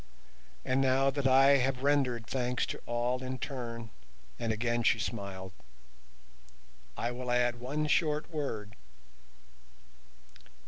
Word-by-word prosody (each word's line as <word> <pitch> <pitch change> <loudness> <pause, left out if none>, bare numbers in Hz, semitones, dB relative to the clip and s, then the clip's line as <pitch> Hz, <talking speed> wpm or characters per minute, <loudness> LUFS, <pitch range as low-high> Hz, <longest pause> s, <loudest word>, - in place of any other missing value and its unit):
And 130 +1 +2
now 135 +1 +3
that 140 -1 0
I 135 +1 +6
have 130 0 0
rendered 135 -5 +2
thanks 125 0 -1
to - - -6
all 120 +2 0
in 130 0 -4
turn"—and 115 - -6
again 120 +2 0
she - - +4
smiled—"I 65 - -9
will 125 0 -5
add 120 0 +2
one 145 +5 -2
short 150 +1 +1
word. 110 -9 -4
120 Hz, 105 wpm, -31 LUFS, 100-130 Hz, -, I